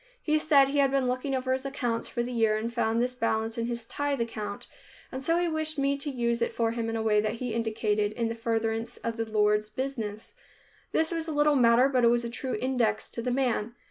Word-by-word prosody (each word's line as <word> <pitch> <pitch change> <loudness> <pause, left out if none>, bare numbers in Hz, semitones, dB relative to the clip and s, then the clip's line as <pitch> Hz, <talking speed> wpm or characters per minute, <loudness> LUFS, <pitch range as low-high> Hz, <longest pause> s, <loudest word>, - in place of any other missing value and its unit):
He 310 -6 +1
said 285 -3 +5
he 285 +1 0
had 275 -1 +4
been 270 -1 +1
looking 255 +2 -1
over 260 0 0
his 260 0 -2
accounts 245 -4 -2
for 240 - -2
the 245 - -5
year 225 -3 +2
and 230 +2 -3
found 230 -1 +1
this 250 +1 0
balance 225 -2 -1
in 230 0 -2
his 235 -1 -3
tithe 285 +3 -2
account, 215 -3 -4 0.5
and 260 - -5
so 330 +5 +1
he 350 0 +1
wished 315 -1 -2
me 275 0 +2
to 290 - -3
use 235 -3 -1
it 235 - +1
for 230 -1 0
him 230 -1 -2
in 225 - -2
a 225 - -1
way 210 -1 +3
that 215 0 -1
he 245 -1 -4
indicated, 215 -2 0
in 230 +1 -1
the 230 - -2
furtherance 225 0 -2
of 230 0 -4
the 225 -1 -3
Lord's 210 0 +2
business. 225 -3 -4 0.6
This 320 +1 +1
was 330 -1 -3
a - - -2
little 295 0 +3
matter, 240 0 +5
but 255 -3 +1
it - - +7
was 240 0 +2
a 235 - -4
true 255 +2 -3
index 245 -5 0
to 235 - -4
the 250 - -2
man. 245 -3 0
235 Hz, 245 wpm, -28 LUFS, 225-270 Hz, 0.6 s, it